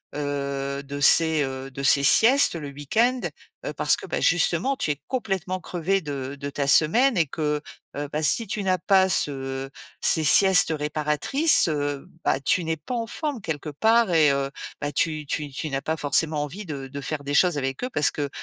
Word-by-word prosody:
heu, 140 -1 -4
de 140 +1 -7
ces 160 0 +5
heu, 135 0 -6
de 135 +1 -7
ces 140 +1 +3
siestes 235 - +5
le 150 -3 -6
week-end? 225 - -1 0.4
Heu, - - -4
parce - - +2
que, - - -10
bah, - - -3
justement, 175 +9 +1
tu 150 - -1
es 145 - -5
complètement 190 -7 -3
crevé 180 +3 -2
de 140 -3 -6
de 140 0 -5
ta 140 0 -3
semaine 225 - +4
et 165 -4 +2
que, 150 0 -3 0.4
heu, 145 0 -4
bah, 150 - -3
si 190 +9 +4
tu 205 +1 -4
n'as 185 -1 +1
pas 190 +2 +2
ce 135 -4 -1 0.3
ces 160 - +5
siestes 185 +2 +5
réparatrices, 150 - +1
heu, 145 0 -3 0.2
bah, - - 0
tu 140 +6 0
n'es 160 0 -3
pas 250 - -8
en 230 -1 -3
forme, 285 0 -5
quelque 160 -4 -5
part, 220 +7 +2
et 155 -3 +4
heu, 140 0 -2 0.3
bah, 145 - -3
tu 155 -1 -1
tu 145 0 -4
tu 155 +4 -5
n'as 135 -1 -3
pas 160 +1 -3
forcément 150 +1 0
envie 190 +8 -8
de 140 -4 -7
de 140 +1 -8
faire 145 +1 -5
des 145 - -4
choses 175 0 +3
avec 135 - -4
eux 250 - -2
parce 145 - +2
que, 145 -1 -4
150 Hz, 200 wpm, -23 LUFS, 140-185 Hz, 0.4 s, ces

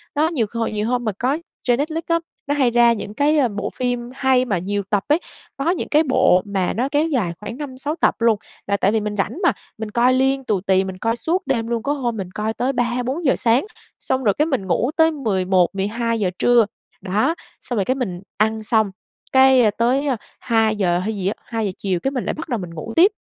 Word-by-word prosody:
Đó, 310 +2 +3
nhiều 285 -10 0
hồi 230 -1 -1
nhiều 210 +1 -2
hôm 245 -1 0
mà 215 - +1
có 265 +5 +1 0.3
trên 245 -1 +2
Netflix 320 +3 -2
á, 335 0 +2 0.3
nó 285 - +1
hay 255 -4 +3
ra 235 0 +5
những 205 -1 -6
cái, 295 +6 +2
ờ, 270 - +4
bộ 205 -2 -4
phim 245 -1 -2
hay 265 -2 +3
mà 205 -6 0
nhiều 200 +3 -2
tập 205 -2 +1
ấy, 300 +3 +3 0.4
có 275 +4 0
những 370 - -3
cái 305 +2 +4
bộ 220 - +4
mà 195 -3 -1
nó 255 +4 -1
kéo 295 +3 +2
dài 235 - 0
khoảng 210 +3 -7
5-6 285 +1 -4
tập - - +2
luôn, 230 -2 +4 0.3
là 200 0 +1
tại 195 - +2
vì 220 - +2
mình 210 0 -3
rảnh 200 - -2
mà, 345 - +5 0.3
mình 220 -1 -5
coi 240 +3 +3
liên 270 +1 +2
tù 205 -6 0
tì, 190 0 +2
mình 190 -1 -6
coi 225 +4 0
suốt 345 +7 -1
đêm 230 -4 0
luôn, 230 -1 -2
có 285 - 0
hôm 240 -5 -2
mình 185 -3 -5
coi 215 +2 -2
tới 255 +4 -1
3-4 250 +5 -1
giờ 265 - +4
sáng, 245 - +2 0.3
xong 260 0 -1
rồi 205 -4 +3
cái 300 - +1
mình 265 -12 -2
ngủ 210 - +1
tới 320 0 +5
11-12 205 - 0
giờ 195 -3 +1
trưa, 240 -3 +5 0.4
đó, 210 - +1 0.3
xong 245 - -3
rồi 195 - +1
cái 255 - +1
mình 190 -9 -4 0.2
ăn 220 +1 +1
xong, 215 -2 +2 0.4
cái 265 -4 +6
tới 255 +6 +1 0.3
2 225 -2 +2
giờ 180 -4 +1
hay 215 +3 -2
gì 190 -1 -2
á 205 - +1
2 225 -2 -2
giờ 195 - -1
chiều, 185 -3 -1
cái 270 - -1
mình 255 -3 -3
lại - - -1
bắt 320 0 -7
đầu 240 -4 -1
mình 175 -2 -7
ngủ 170 +8 -6
tiếp, 370 +6 +6
235 Hz, 240 wpm, -21 LUFS, 205-270 Hz, 0.4 s, cái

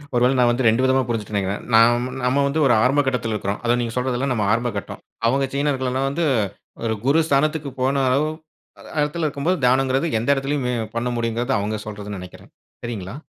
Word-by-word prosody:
ஒருவேள 125 +2 +3
நான் 120 -1 +5
வந்து 120 +1 0
2 115 +4 +2
விதமா 130 0 +3
புரிஞ்சுட்டேன் 110 -3 -3
நினைக்கிறேன். 100 +1 -2
நாம் 120 +2 +5 0.2
நம்ம 135 +3 +2
வந்து 140 +3 -1
ஒரு 120 - +4
ஆரம்ப 135 +3 +3
கட்டத்துல 120 -4 -1
இருக்குறோம். 100 0 -3
அதான் 120 0 +2
நீங்க 115 -1 -3
சொல்றதெல்லாம் 130 +1 -1
நம்ம 110 -4 0
ஆரம்ப 120 +1 0
கட்டம். 100 - -7 0.3
அவுங்க 135 +3 +1
சீனர்கள் 140 -2 0
எல்லாம் 135 +1 0
வந்து 165 +4 -1 0.6
ஒரு 110 -1 0
குரு 140 +4 +4
ஸ்தானத்துக்கு 150 +1 +1
போன 135 +2 +2
அளவு 140 +4 +2 0.5
அ - - -13 0.2
இடத்தில 150 +3 -1
இருக்கும்போது, 150 +6 -1
தியானங்குறது 130 +4 +2
எந்த 115 - -3
எடத்துலயுமே 135 -2 -1 0.2
பண்ண 120 +1 -1
முடியுங்குறது 120 +2 -1
அவுங்க 105 +2 -2
சொல்றதுன்னு 105 -1 -6
நினைக்கிறேன். 90 0 -12 0.3
சரிங்களா? 110 -3 -5
125 Hz, 185 wpm, -22 LUFS, 115-140 Hz, 0.6 s, நான்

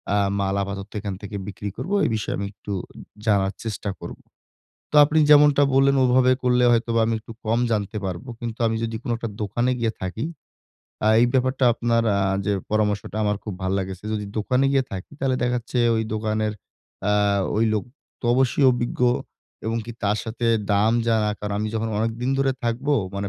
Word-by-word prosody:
আ - - +3 0.2
মাল 95 0 0
আপাতত 100 +1 -6
এখান 100 -1 -4
থেকে 105 0 -7
বিক্রি 100 0 -5
করব। 185 - -5
এ - - +3
বিষয়ে 110 - -2
আমি 100 - -3
একটু 100 - -9 0.2
উম - - -12 0.2
জানার 100 -2 +2
চেষ্টা 105 -2 -4
করব। - - -8 0.7
তো - - -2
আপনি 155 +2 +2
যেমনটা 145 -1 +7
বললেন, 135 +1 +4
ওভাবে 130 0 +4
করলে 125 0 +3
হয়তো 115 0 +1
বা 115 - +4
আমি 115 - 0
একটু 110 - -12
কম 115 +2 +1
জানতে 105 0 -1
পারবো। 95 +6 -5
কিন্তু 120 -1 -5
আমি 110 - 0
যদি 115 0 -3
কোন 125 - -7
একটা 115 0 -4
দোকানে 120 +5 0
গিয়ে 115 -1 +1
থাকি, 95 +7 -3 0.8
আ - - +4
এই 120 - +5
ব্যাপারটা 130 0 +1
আপনার 115 0 +1 0.2
আ - - +1 0.3
যে 105 - +2 0.2
পরামর্শটা, 105 -1 0
আমার 105 0 +1
খুব 105 - -4
ভাল 95 +1 0
লাগেছে 95 0 -5
যদি 105 -1 -2
দোকানে 125 +5 +2
গিয়ে 135 -1 +3
থাকি, 95 +7 -7
তালে 135 -1 +1
দেখাচ্ছে 125 0 -1 0.2
ওই 110 - +1
দোকানের 110 0 -1 0.6
আ - - +3 0.4
ওই 110 - +3
লোক 105 - 0 0.4
তো - - -13
অবশ্যই 130 +2 +2
অভিজ্ঞ 120 0 -3 0.7
এবং 115 +1 0
কি 120 - -7
তার 105 +1 +1
সাথে 115 +1 -3 0.3
দাম 105 +3 +3
জানা। 110 -2 +2
কারণ, 105 -1 -4
আমি 110 - -1
যখন 110 0 -1
অনেকদিন 115 +3 -1
ধরে 135 -1 +2
থাকবো, 125 +5 0 0.2
মানে 100 0 -3
115 Hz, 190 wpm, -23 LUFS, 105-125 Hz, 0.8 s, যেমনটা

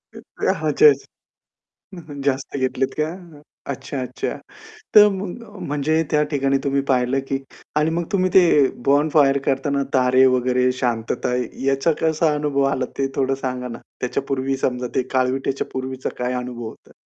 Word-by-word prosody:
एक - - -9 0.2
ह्या - - +3
ह्याच्या 450 - +5
ह्याच्यात. 435 - +3 0.9
हं, 180 - -8
हं. 140 - -7
जास्त 140 0 -1
घेतलेत 130 0 -1
का? 155 - +2 0.3
अ, - - -16 0.3
अच्छा, 135 +1 -6
अच्छा. 130 - -4 0.6
तर 210 0 +9
मग 195 +4 -5 0.3
म्हणजे 150 +3 +1
त्या 150 -1 +3
ठिकाणी 135 -1 +1
तुम्ही 140 0 +1
पाहिलं 125 +1 +2
की 135 - 0 0.4
आणि 150 +1 +2
मग 170 +1 -1
तुम्ही 185 -2 +2
ते 185 - +8 0.4
बोनफायर 145 -1 +4
करताना 140 +1 0
तारे 130 0 +5
वगैरे, 125 0 +2
शांतता 120 -1 -1 0.3
याचा 135 +4 +2
कसा 160 0 +2
अनुभव 145 -2 0
आला 130 - -1
ते 135 - +1
थोडं 135 0 +1
सांगा 125 -1 -3
ना? 115 - -7 0.2
त्याच्या 125 - -2
पूर्वी 135 0 -1
समजा 125 -1 -1
ते - - +2
काळविट्याच्या 130 +1 0
पूर्वीचा 130 0 -4
काय 125 0 -1
अनुभव 125 -2 -5
होता? - - -15
135 Hz, 160 wpm, -21 LUFS, 130-150 Hz, 0.9 s, तर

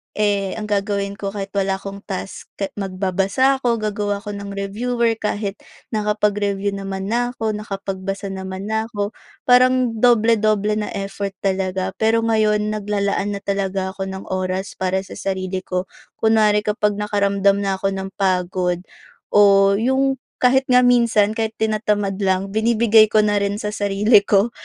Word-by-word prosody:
eh, 200 -2 0
ang 220 - -5
gagawin 200 0 -1
ko 200 0 -4
kahit 195 -1 -5
wala 195 -1 0
akong 195 +1 -8
task, 195 -1 -6
ka 195 - -3
magbabasa 195 +7 +1
ako, 240 -3 +1
gagawa 205 -1 -2
ako 210 - -5
ng 200 0 -6
reviewer 225 +3 -1
kahit 205 -1 -3 0.3
nakapag-review 210 -2 0
naman 195 +1 -5
na 245 +1 0
ako, 220 -2 -1
nakapagbasa 195 -1 -5
naman 190 +2 -6
na 220 +1 0
ako. 205 -2 -3 0.3
Parang 250 -2 +4
doble-doble 215 -3 +3
na 210 - -3
effort 195 0 -4
talaga. 190 -1 -1
Pero 225 +1 +2
ngayon, 215 -1 +2
naglalaan 205 -1 -1
na 200 - -6
talaga 195 -1 -2
ako 190 0 -5
ng 190 0 -6
oras 185 +1 -3
para 190 0 0
sa - - -11
sarili 190 -1 -2
ko. 185 0 -3 0.3
Kunwari 215 -2 +3
kapag 210 0 0
nakaramdam 200 -1 +1
na 195 -1 0
ako 195 +1 -1
ng 195 0 -4
pagod 180 -2 0 0.5
o 195 -1 +6
yung 265 +5 +1 0.3
kahit 265 +1 +4
nga 250 0 +5
minsan 235 -4 +4
kahit 220 0 -3
tinatamad 210 -2 -1
lang, 195 0 0
binibigay 220 0 +4
ko 215 0 +3
na 205 -1 +2
rin 200 0 -1
sa 210 0 -4
sarili 205 +2 +3
ko. 205 +3 +2
205 Hz, 155 wpm, -20 LUFS, 195-220 Hz, 0.5 s, o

